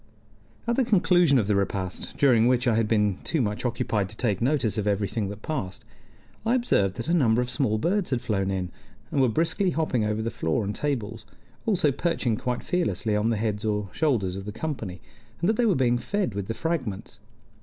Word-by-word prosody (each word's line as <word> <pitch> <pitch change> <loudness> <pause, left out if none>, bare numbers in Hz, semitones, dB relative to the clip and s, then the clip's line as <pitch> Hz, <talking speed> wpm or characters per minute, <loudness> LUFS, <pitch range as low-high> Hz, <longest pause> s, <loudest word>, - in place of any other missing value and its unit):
At 235 0 0
the 265 - +4
conclusion 180 - +4
of 110 -5 +1
the 105 - +2
repast, 95 -2 -2
during 120 -5 +5
which 125 0 +2
I 120 - +4
had 110 0 +2
been 105 -3 +2
too 165 - -1
much 105 -4 -1
occupied 115 -5 -1
to 110 - -11
take 105 -6 0
notice 120 -4 +1
of 105 - -2
everything 100 0 0
that 105 +1 -8
passed, 105 -10 -4 0.6
I 230 +3 +2
observed 100 - +1
that - - -5
a 170 - +1
number 120 -9 +3
of 125 0 0
small 110 -7 +1
birds 180 - 0
had 130 - 0
flown 105 -6 -1
in, 95 -2 -2 0.4
and 140 - +2
were 130 - +4
briskly 170 - +1
hopping 155 -9 0
over 105 +1 -1
the 115 - -2
floor 80 +7 -1
and 100 +1 -2
tables, 115 -5 -3 0.4
also 180 -9 +3
perching 130 -6 0
quite 125 +2 -3
fearlessly 165 - 0
on 105 +2 +1
the 115 - +1
heads 105 -1 -2
or 105 -2 -1
shoulders 115 - 0
of 95 0 -6
the 105 - -4
company, 110 - -5 0.4
and 170 - 0
that 220 - +4
they 235 +1 +2
were 195 - +3
being 120 -3 +2
fed 200 - -1
with 100 -1 -4
the 115 - -3
fragments. 130 - -3
115 Hz, 210 wpm, -26 LUFS, 105-155 Hz, 0.6 s, during